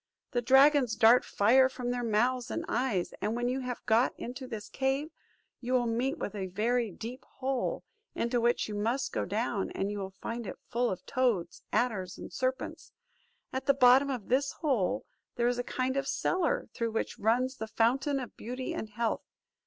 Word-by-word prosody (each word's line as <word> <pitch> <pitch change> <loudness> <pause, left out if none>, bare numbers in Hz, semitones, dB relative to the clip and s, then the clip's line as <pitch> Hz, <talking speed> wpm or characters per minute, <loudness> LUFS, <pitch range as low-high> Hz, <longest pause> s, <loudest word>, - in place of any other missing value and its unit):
The 245 -3 +1
dragons 265 -1 +5
dart 230 +3 +6
fire 260 +6 +4
from 250 -2 -3
their 245 0 -2
mouths 240 +3 +1
and 330 - -3
eyes; 240 - 0
and 215 +2 0
when 240 0 -1
you 255 +2 0
have 250 -2 -5
got 230 +3 +3
into 255 +2 -6
this 220 -4 -6
cave, 270 +3 -1 0.5
you 250 +1 -3
will 250 -1 +3
meet 240 +4 0
with - - -4
a 195 -3 -3
very 225 +5 0
deep 235 +7 -8
hole, 265 -1 -1 0.3
into 235 0 0
which 240 +1 +2
you 215 - -5
must 230 +6 -1
go - - -1
down, 210 0 -1
and 195 +1 -1
you 205 - -4
will 190 -1 -6
find 230 -1 -4
it - - -6
full 245 0 +1
of 185 -1 -5
toads, 240 -9 0
adders 195 -7 0
and - - -9
serpents. 260 0 -3 0.6
At 265 +1 -3
the 275 - +5
bottom 265 +1 +6
of 250 -7 -4
this 270 +2 +1
hole 260 - 0 0.3
there 240 0 +2
is 245 0 0
a - - 0
kind 255 +1 -1
of 275 0 -1
cellar, 350 +1 0
through 230 -2 -2
which 225 - -2
runs 250 +5 +1
the 220 - -4
fountain 265 +6 +1
of 250 - -7
beauty 250 +3 -5
and 220 - -4
health. 225 +1 -1
245 Hz, 190 wpm, -30 LUFS, 225-260 Hz, 0.6 s, dart